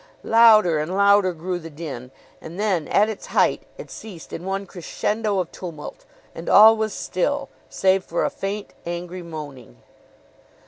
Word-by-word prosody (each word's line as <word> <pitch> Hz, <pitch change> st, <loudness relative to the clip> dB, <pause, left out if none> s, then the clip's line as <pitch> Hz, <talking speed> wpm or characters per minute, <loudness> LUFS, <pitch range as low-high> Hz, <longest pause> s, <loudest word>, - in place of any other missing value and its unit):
Louder 215 Hz, -8 st, +5 dB
and 160 Hz, +5 st, -3 dB
louder 200 Hz, -1 st, +4 dB
grew 175 Hz, +2 st, -4 dB
the 165 Hz, -1 st, -9 dB
din; 145 Hz, -5 st, -8 dB, 0.3 s
and 170 Hz, +4 st, -9 dB
then, 190 Hz, -7 st, 0 dB
at 210 Hz, -, +3 dB
its 220 Hz, -2 st, -6 dB
height, -, -, +2 dB, 0.2 s
it -, -, -10 dB
ceased 190 Hz, -7 st, -10 dB
in 170 Hz, -, -6 dB
one 195 Hz, +1 st, -3 dB
crescendo 205 Hz, +4 st, -2 dB
of 180 Hz, -3 st, -2 dB
tumult, 165 Hz, -5 st, -9 dB, 0.3 s
and 165 Hz, -, -7 dB
all 220 Hz, +2 st, +8 dB
was 220 Hz, -1 st, -2 dB
still, 275 Hz, +12 st, -2 dB, 0.2 s
save 190 Hz, 0 st, +2 dB
for 170 Hz, -, -1 dB
a -, -, -1 dB
faint, 200 Hz, +1 st, -5 dB
angry 175 Hz, +1 st, -5 dB
moaning. 145 Hz, -, -9 dB
185 Hz, 155 wpm, -22 LUFS, 165-210 Hz, 0.3 s, all